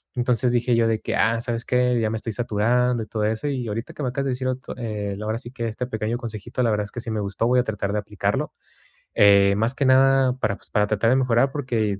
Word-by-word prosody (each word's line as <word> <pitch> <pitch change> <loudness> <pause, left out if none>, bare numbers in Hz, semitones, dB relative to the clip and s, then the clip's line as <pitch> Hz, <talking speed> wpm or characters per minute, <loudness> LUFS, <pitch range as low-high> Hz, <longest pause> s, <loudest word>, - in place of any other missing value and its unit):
entonces 125 0 +1
dije 120 0 +2
yo 115 0 +3
de 110 -1 0
que: - - -2
"Ah, 115 +2 +2
¿sabes 115 0 -3
qué?, 125 -1 +2
ya 110 -1 0
me 110 - -2
estoy 110 +1 -4
saturando 120 +2 +1
y - - -11
todo 110 -2 -3
eso", 110 +7 -1
y 130 -4 -2
ahorita 110 +3 -5
que 150 - -6
me 130 - 0
acabas 135 +2 -3
de 135 - 0
decir 130 +1 -3
ot 130 0 -1 0.2
eh, 105 -4 -4
la 105 - -6
verdad, 110 +1 -1
sí 120 -1 -9
que 120 -3 -4
este 115 +3 -4
pequeño 110 0 -2
consejito, 120 0 -5
la 115 - +2
verdad 105 -1 0
es 105 - -11
que, - - -6
sí 115 - -6
me 110 - -2
gustó, 100 +2 -1
voy 125 +1 +3
a - - +3
tratar 105 -3 -3
de 105 - 0
aplicarlo, 105 0 -2 0.6
eh, 100 -1 +5
más 115 +4 0
que 140 - 0
nada, 135 0 +4
para, 100 -5 0
pues, - - -18
para 105 -1 +2
tratar 110 +2 +1
de 130 - +4
mejorar 130 0 +2
porque 115 -8 -1
115 Hz, 270 wpm, -23 LUFS, 105-125 Hz, 0.6 s, eh